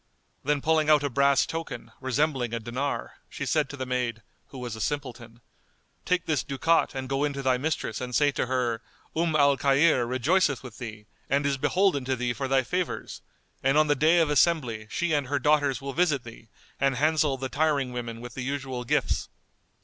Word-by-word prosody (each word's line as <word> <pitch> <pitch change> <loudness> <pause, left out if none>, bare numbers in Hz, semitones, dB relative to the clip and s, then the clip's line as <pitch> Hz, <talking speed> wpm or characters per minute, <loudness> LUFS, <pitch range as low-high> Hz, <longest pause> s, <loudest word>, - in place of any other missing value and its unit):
Then 145 0 +1
pulling 155 -1 +2
out 150 -2 +5
a 145 - -1
brass 140 +1 +3
token, 125 -8 -6
resembling 130 -2 0
a - - -2
dinar, 125 +5 -4
she - - -5
said - - +1
to 145 - -8
the 130 - -3
maid, 125 -3 -2 0.2
who 135 - -11
was 120 -3 -5
a 110 - -7
simpleton, 120 -4 -4 0.6
"Take 180 -1 +1
this 155 -5 0
ducat 150 +3 +1
and 130 0 -4
go 135 +2 0
in 145 -1 0
to 140 0 -5
thy 130 -1 +2
mistress 145 -5 -2
and 125 -1 -4
say 145 -1 +4
to 125 - -2
her, 120 -3 -1 0.3
'Umm 165 -1 +1
al 140 -2 +4
Khayr 140 -1 +3
rejoiceth 140 +3 +1
with 125 -4 -10
thee 105 -3 -7 0.2
and 140 +2 +1
is 140 -1 +1
beholden 185 -3 +2
to 130 0 0
thee 120 0 -1
for 135 +4 -3
thy 135 0 +3
favours, 180 +6 -3 0.4
and 135 +2 +2
on 155 - +5
the 145 -1 +2
day 155 +5 +4
of 160 -3 +3
assembly 130 -9 +2
she 175 +4 -1
and 145 -3 +1
her 145 +2 0
daughters 145 -2 +2
will 140 0 -4
visit 155 -6 +1
thee 115 -1 -12 0.3
and 135 -1 +2
handsel 150 0 +2
the 130 0 -3
tiring 140 -2 0
women 115 -2 -5
with 120 -1 -8
the 130 - -5
usual 130 -1 -3
gifts. 120 - 0
135 Hz, 205 wpm, -27 LUFS, 125-150 Hz, 0.6 s, out